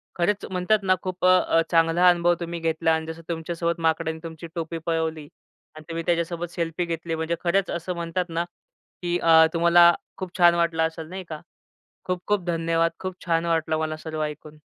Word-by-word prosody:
खरंच 195 +4 0
म्हणतात 185 +4 +2
ना, 185 -1 +3
खूप 185 -1 -3
अ, 185 0 +6
अ, 165 - +2
चांगला 165 +2 +4
अनुभव 175 0 +3
तुम्ही 170 0 -4
घेतला 165 0 +1
आणि 160 0 -1
जसं 160 +1 -7
तुमच्यासोबत 170 +1 -2
माकडाने 160 0 0
तुमची 165 0 -8
टोपी 165 0 -3
पळवली 160 -2 -2 0.5
आणि 155 - -11
तुम्ही 165 0 -3
त्याच्यासोबत 170 0 -1
सेल्फी 170 0 -2
घेतली 165 0 -3
म्हणजे 160 +1 -2
खरंच 190 +3 +1
असं 175 +2 -3
म्हणतात 170 +1 -2
ना, 165 +1 -1 0.6
की 175 0 0
अ, 160 -1 +6
तुम्हाला 170 +1 +6 0.2
खूप 185 -1 -7
छान 175 -1 +6
वाटलं 170 -1 +1
असेल 160 -1 -8
नाही 190 0 -6
का? 155 -1 -6 0.6
खूप 180 -1 -2
खूप 205 -3 +1
धन्यवाद. 165 0 +1
खूप 185 -1 -5
छान 165 -1 +1
वाटलं 160 -1 0
मला 155 0 -2
सर्व 155 -1 -4
ऐकून. 150 0 -7
170 Hz, 185 wpm, -24 LUFS, 160-175 Hz, 0.6 s, अ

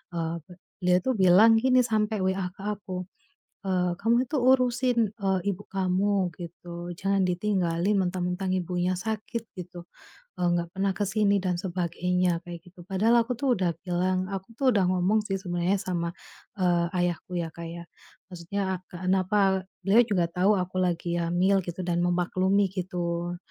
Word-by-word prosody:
Eee, 165 0 -2
be 180 - -12 0.3
dia 180 0 +4
tuh 260 -2 0
bilang 195 +5 +6
gini 255 +1 +4
sampe 215 -1 0
WA 190 -1 0
ke - - -13
aku, 185 -3 -6 0.6
eee, 180 -2 +1
"Kamu 235 +4 +2
tuh 290 -5 0
urusin, 250 -3 +2
eee, 190 -2 +1
ibu 200 +2 -8
kamu," 190 0 +1
gitu, 175 0 -8
"jangan 195 +1 +1
ditinggalin 180 0 0
mentang-mentang 185 0 -1
ibunya 180 0 -1
sakit," 220 +4 -4
gitu, 175 -1 -8 0.6
eee, 175 - +2
"gak 170 0 -3
pernah 195 0 0
ke 205 - 0
sini," 205 0 +2
dan 180 -2 0
sebagainya, 180 -1 0
kayak 170 -1 -9
gitu. 180 0 -16
Padahal 225 +5 +3
aku 250 - -1
tuh 270 -2 +2
udah 180 -2 +1
bilang, 185 +1 0
aku 195 +4 -6
tuh 265 -2 +3
udah 195 -2 +3
ngomong 185 +4 +2
sih 195 - -1
sebenarnya 180 +1 0
sama, 170 -2 -2 0.5
eee, 175 -2 +2
ayahku 175 0 -1
ya, 165 -1 -3
Kak 170 0 -7
ya, 170 +1 -8 0.5
maksudnya 185 +1 -3
kenapa 190 +2 +1 0.2
beliau 220 +5 +6
juga 180 -6 +1
tahu 195 +3 +3
aku 185 0 -4
lagi 175 -1 -1
hamil 180 +3 +2
gitu 175 +1 -5
dan 175 -1 0
memaklumi 185 +3 +2
gitu. 175 -2 -3
185 Hz, 160 wpm, -27 LUFS, 175-200 Hz, 0.6 s, bilang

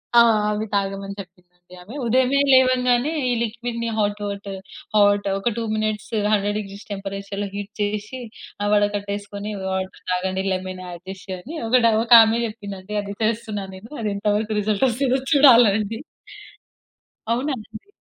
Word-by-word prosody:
ఆ! - - +9 0.3
అవి 210 +1 -1
తాగమని 195 0 -2
చెప్పిందండి 180 -1 -14
ఆమె. 215 +9 -11
ఉదయమే 260 +3 +3
లేవంగానే 255 +1 +4 0.2
ఈ - - +2
లిక్విడ్‌ని 235 0 -3
హాట్ 205 -1 0
వాటర్ 200 -1 -5 0.4
హాట్ 205 -1 +4
ఒక 215 +5 0
2 230 - -1
మినిట్స్ 215 0 -2 0.2
100° 205 0 +1
డిగ్రీస్ 200 0 -9
టెంపరేచర్‌లో 200 0 -4
హీట్ 205 +1 -5
చేసి 210 +4 -3 0.4
ఆహ్, 205 - 0
వడ 205 - +4
కట్టేసుకొని 205 +1 -5 0.2
వాటర్ 190 0 -4
తాగండి 190 +1 -1
లెమన్ 185 0 -4
అడ్ 175 0 -10
చేసి 190 - -7
ఒకటి 250 +1 +4 0.2
ఒక 235 - -11
ఆమె 225 +1 +1
చెప్పింది 205 -3 -7
అండి 195 +3 -7
అది 200 0 -7
చేస్తున్నా 215 -2 -1
నేను. 200 +4 -12
అదెంత 205 -1 -3
వరకు 215 0 -2
రిజల్ట్ 210 +4 +1
వస్తుందో 260 +2 +1
చూడాలండి. 230 -6 +5 1.3
అవునా 265 +5 -1
అండి! 220 - -12
205 Hz, 145 wpm, -22 LUFS, 195-230 Hz, 1.3 s, ఆ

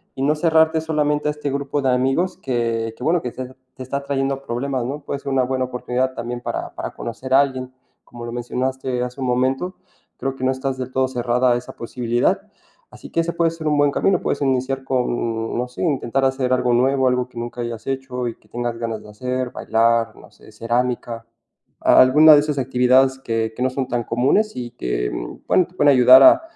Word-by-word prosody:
Y 135 - -3
no 150 +2 +2
cerrarte 160 0 +3
solamente 150 -2 0
a - - +1
este 150 -1 -4
grupo 140 +1 -2
de 135 - +1
amigos 135 +10 0
que 115 -6 -2
que - - -9
bueno 165 +4 +2
que 125 - -4
se 130 - -6 0.3
te 130 - -7
está 140 +2 -4
trayendo 135 -1 -1
problemas, 130 0 -3
¿no? 145 +4 -4
Puede 140 0 -5
ser 140 - -5
una 130 -1 +2
buena 130 0 -1
oportunidad 125 +1 -2
también 120 +1 -5
para - - -4
para - - -4
conocer 130 +3 -5
a 135 - +7
alguien. 130 -2 -3 0.3
Como 120 -1 -10
lo 120 - -6
mencionaste 125 +1 -2
hace 125 +2 -6
un 130 - -1
momento. 130 +9 0 0.4
Creo 135 0 -3
que 130 - -8
no 130 - +3
estás 130 0 -3
del 130 0 -5
todo 130 0 +1
cerrada 125 0 +1
a - - +1
esa 120 - -9
posibilidad. 120 0 -1 0.5
Así - - -12
que 165 - +1
ese 170 +1 -2
puede 170 -1 +1
ser 165 -2 -6
un 150 - +2
buen 145 0 +4
camino, 185 +4 +1
puedes - - -2
iniciar 135 0 0
con, 120 -3 -2
no 125 +1 -1
sé, 125 - -9
intentar 135 -4 0
hacer 130 -1 0
algo 125 -1 +2
nuevo, 130 +2 +2
algo 125 0 0
que 120 - -16
nunca 120 +1 -5
hayas 120 0 -6
hecho 130 -2 -3
y 115 - -5
que - - -29
tengas 120 -1 -3
ganas 115 -2 -4
de - - -14
hacer, 125 +3 -3
bailar, 115 0 +1
o - - -14
hacer - - -19
cerámica. 120 0 -2 0.6
A, - - +6
alguna 150 +5 +7
de 145 - +7
esas 150 -2 -2
actividades 130 +1 +3
que 115 -3 -2
que 125 - -2
no 130 - +2
son 130 -1 -3
tan 120 -1 -1
comunes 135 - +1
y 120 -1 -5
que, - - -2 0.4
bueno, 180 - +3
te 180 - -24
pueden 145 -5 +5
ayudar 130 +1 +8
a - - +8
130 Hz, 215 wpm, -21 LUFS, 120-140 Hz, 0.6 s, ayudar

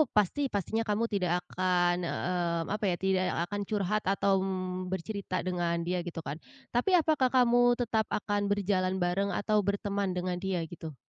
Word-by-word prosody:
pasti 210 +7 +2
pastinya 215 +3 -1
kamu 215 0 0
tidak 185 -4 +1 0.2
akan, 180 -1 +2
mmm, 175 -1 -1
apa 215 - -6
ya, - - +1
tidak 190 -1 +1 0.2
akan 205 +2 -3
curhat 210 0 0
atau 195 +1 +2
m - - -2 0.4
bercerita 190 +1 -4
dengan 175 -2 0
dia 180 0 0
gitu 170 - -5
kan. 140 - -3 0.4
Tapi 245 +10 +2
apakah 310 -5 +3
kamu 245 -2 +4 0.2
tetap 225 -2 +1
akan 205 -1 0
berjalan 190 -2 +1
bareng 195 +3 0
atau 210 +3 +1
berteman 200 0 -1
dengan 180 0 -1
dia 190 -1 -1
gitu? 160 -2 -8
195 Hz, 160 wpm, -30 LUFS, 180-210 Hz, 0.4 s, kamu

